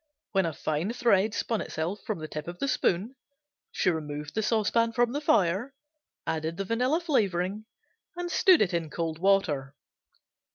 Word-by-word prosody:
When 190 -3 +2
a 160 - -3
fine 155 +8 -2
thread 220 -4 +2
spun 225 -2 -1
itself 170 +6 -3
from 215 -4 -3
the 155 -1 -6
tip 150 0 -6
of 175 0 -6
the 275 - -1
spoon 235 -2 0 0.6
she 185 - +2
removed 150 -2 -5
the 220 - 0
saucepan 230 +1 +1
from 240 0 +2
the 290 +3 -2
fire, 240 - +2 0.5
added 160 +1 -2
the 195 - -2
vanilla 250 - +1
flavoring 205 - 0 0.5
and 350 0 -4
stood 370 - +5
it 185 -2 -2
in 165 -2 -1
cold 160 0 -3
water. 155 -8 +1
195 Hz, 165 wpm, -28 LUFS, 165-235 Hz, 0.6 s, stood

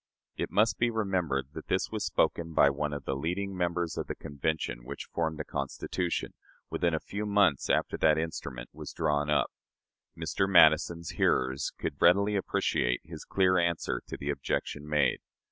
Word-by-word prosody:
" - - -65
It - - -3
must 110 +2 +2
be 120 - +3
remembered 90 - -1
that - - -8
this - - 0
was - - -2
spoken 80 -1 0
by 70 - +6
one 75 +1 -2
of 70 -1 -5
the 65 - -1
leading 90 +7 -2
members 85 -2 -1
of - - -3
the - - -4
Convention 70 -4 -3
which 70 +3 -7
formed 80 -2 -1
the 75 - -3
Constitution, 75 +5 -3 0.4
within 85 -2 +1
a - - -1
few 100 +6 -5
months 100 -9 +3
after - - +1
that 80 -1 +4
instrument 80 0 -4
was - - -8
drawn 75 0 0
up. 75 - +2 0.7
Mr. 95 0 -1
Madison's 85 -1 +5
hearers 65 +2 +1
could 70 - -4
readily 100 +4 +5
appreciate 60 -10 0
his 80 -1 -9
clear 95 -1 +3
answer 85 -1 0
to - - -6
the 70 +1 -2
objection 75 +1 -3
made. 75 -3 +2
80 Hz, 175 wpm, -29 LUFS, 70-90 Hz, 0.7 s, by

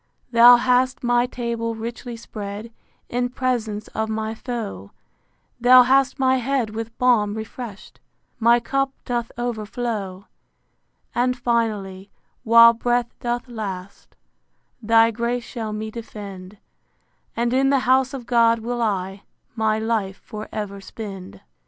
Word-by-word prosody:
Thou 240 +1 +9
hast 250 +1 +1
my 245 0 +2
table 235 -2 -3
richly 235 +1 -6
spread 210 0 -7 0.3
In 245 +1 -1
presence 235 -5 -2
of 220 0 -3
my 220 0 -2
foe: 220 - -6 0.7
Thou 250 +1 +8
hast 270 +2 +3
my 260 -1 +3
head 255 -3 -1
with 225 +1 -6
balm 220 -5 +3
refresh'd, 220 -1 -8 0.4
My 235 +1 +5
cup 275 +3 -1
doth 240 -2 -2
overflow. 215 -4 -4 0.9
And 250 +1 +1
finally, 210 -5 -1 0.3
while 230 0 +8
breath 240 +1 -1
doth 240 +1 -3
last, 200 -5 -7 0.7
Thy 225 +1 +4
grace 235 +2 -2
shall 225 -3 -5
me 215 +1 -5
defend: 205 -4 -9 0.8
And 235 +1 0
in 270 +1 +3
the 275 -1 +3
house 260 +1 +3
of 250 -3 -7
God 230 -1 +4
will 240 +2 -3
I 195 -3 -2 0.3
My 220 -1 +1
life 220 -3 -1
for 215 0 -8
ever 200 -2 -5
spend. 195 - -9
230 Hz, 125 wpm, -22 LUFS, 215-245 Hz, 0.9 s, Thou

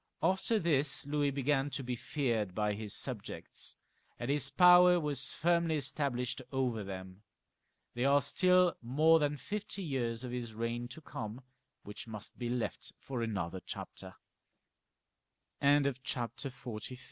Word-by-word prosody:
After 190 +4 +2
this 150 -6 +2
Louis 145 0 +1
began 140 0 +1
to 135 - -4
be 125 0 -2
feared 115 - -1
by 105 -1 +1
his 105 0 -5
subjects, - - -4 0.4
and 120 +3 -2
his 140 -2 +1
power 180 +3 +7
was 145 -4 0
firmly 170 -1 +2
established 135 -3 -1
over 125 -5 0
them. 95 0 -8 0.7
There 125 +3 +1
are 140 -1 +4
still 180 +1 +4
more 155 +7 +4
than 145 -1 0
fifty 205 +4 -4
years 120 -6 -2
of 125 - -5
his 120 -3 -4
reign 115 +1 -2
to 130 +6 -10
come, 110 -4 -6 0.4
which 105 +3 -8
must 105 0 -8
be 120 -1 -2
left 120 -1 -3
for 130 -3 -5
anoth 95 -5 -3
135 Hz, 125 wpm, -33 LUFS, 115-150 Hz, 0.7 s, power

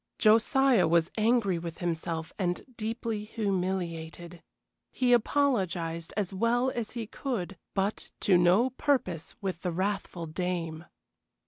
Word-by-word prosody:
Josiah 230 - +4
was 170 +1 +3
angry 220 -5 +2
with 165 -1 -6
himself 165 -2 -3
and 180 -2 -1
deeply 225 -1 -3
humiliated. 180 -5 -3 0.5
He 250 -1 +2
apologized 190 - +1
as 200 -2 -1
well 240 +6 +2
as 235 -4 -4
he 235 -2 -3
could, 215 -5 -4 0.2
but 195 +2 -1
to 190 - +4
no 180 +9 +4
purpose 245 - -1
with 185 -4 -3
the 180 - -1
wrathful 185 -1 -2
dame. 165 -1 -3
190 Hz, 120 wpm, -29 LUFS, 170-230 Hz, 0.5 s, Josiah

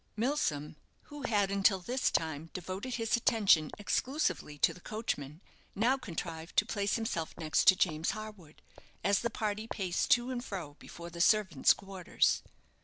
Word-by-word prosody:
Milsom, 170 - -1 0.4
who 295 - -7
had 205 -3 +1
until 195 0 +3
this 245 +8 0
time 160 0 -2
devoted 190 +7 -5
his 225 0 +1
attention 200 -10 +3
exclusively 205 - -1
to - - +3
the 180 - -15
coachman, 155 -9 -4 0.3
now 235 +6 +3
contrived 170 -8 -6
to 205 - +5
place 205 -4 -1
himself 200 -8 -3
next 155 -2 +1
to 190 - +9
James 160 -3 0
Harwood, 210 -8 -10 0.4
as 200 +2 +3
the 235 - -1
party 215 -1 -3
paced 185 -6 -2
to 245 +1 +3
and 245 -1 -3
fro 175 - -6
before 170 0 -10
the 170 0 -4
servants' 190 -7 +4
quarters. 195 -2 0
195 Hz, 155 wpm, -32 LUFS, 165-225 Hz, 0.4 s, to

